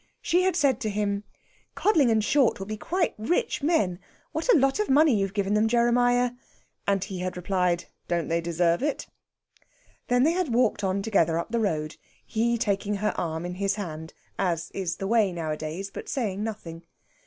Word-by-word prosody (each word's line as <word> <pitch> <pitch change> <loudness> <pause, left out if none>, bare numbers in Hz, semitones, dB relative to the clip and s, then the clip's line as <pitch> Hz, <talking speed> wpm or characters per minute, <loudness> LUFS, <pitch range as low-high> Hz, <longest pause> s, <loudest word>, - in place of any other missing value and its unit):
She 355 - +3
had 370 -1 +1
said 280 -8 +2
to 220 -5 -2
him: 205 0 -1 0.5
"Codling 320 - +3
and 220 -1 +2
Short 270 +2 +3
will 195 - -6
be 215 +2 -4
quite 350 - -1
rich 345 - 0
men! 215 - +1 0.3
What - - +1
a 385 - +6
lot 270 +5 +2
of 425 - 0
money 295 +1 +5
you've 195 0 -1
given 200 0 0
them, 210 +1 +3
Jeremiah!" 245 +1 +3 0.6
And 195 -2 +2
he 195 -2 -6
had 180 0 -3
replied: 180 -1 0 0.2
"Don't 170 -1 -1
they 165 +1 0
deserve 170 0 +1
it?" 290 +1 -1 1.0
They 245 - +1 0.2
had 360 0 0
then 240 - -3
walked 230 -4 +2
on 195 +1 0
together 170 -7 +2
up 170 - -4
the 235 - +1
road, 155 -8 -1 0.3
he 235 +2 0
taking 205 -1 0
her 210 +1 -1
arm 160 0 -3
in 180 - -4
his 195 +2 -1
hand, 160 -6 -6 0.2
as 170 -3 -1
is 180 -3 -3
the 195 - -5
way 215 -2 +3
nowadays, 160 +3 -4
but - - -7
saying 210 -7 -2
nothing. 180 -7 -6
205 Hz, 190 wpm, -26 LUFS, 180-245 Hz, 1.0 s, a